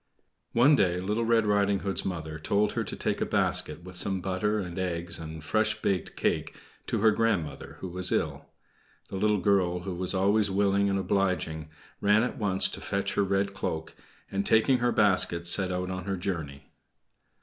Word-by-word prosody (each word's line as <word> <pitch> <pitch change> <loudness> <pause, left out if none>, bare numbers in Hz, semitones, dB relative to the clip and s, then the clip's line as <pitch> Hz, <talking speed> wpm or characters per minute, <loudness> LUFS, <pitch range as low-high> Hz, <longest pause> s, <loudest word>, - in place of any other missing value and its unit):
One 130 +6 +6
day, 90 -7 +2
Little 105 +5 -1
Red 115 -1 +3
Riding 100 -1 +2
Hood's 100 -1 -2
mother 80 -4 -5
told 100 +6 +1
her - - -2
to - - -5
take - - -2
a - - +4
basket 85 - -1
with 90 0 -10
some 95 +2 -1
butter 95 +3 -1
and 90 -3 -4
eggs 85 -2 -3
and 80 -1 -8
fresh 110 +6 +1
baked 95 -3 -1
cake - - -1 0.3
to - - -1
her 110 0 +6
grandmother, 100 -11 -1
who 95 - -4
was 90 +1 0
ill. - - -1 0.6
The 95 - -5
little 105 +2 +2
girl, 90 -2 +1
who 95 +1 -5
was 90 +2 -1
always 100 +2 +3
willing 100 0 +2
and 100 - +1
obliging, 90 -6 -1 0.3
ran 105 +2 +4
at 125 - -3
once 95 -3 +3
to - - -8
fetch 100 0 -2
her 100 - +2
red 100 0 0
cloak, 80 -4 -4 0.4
and, 100 0 -1
taking 120 +5 +3
her 120 0 +1
basket, 95 -6 +3
set 95 +2 +3
out 90 +1 -2
on 90 -1 -5
her 95 -1 -2
journey. 80 -7 -5
95 Hz, 185 wpm, -28 LUFS, 90-105 Hz, 0.6 s, One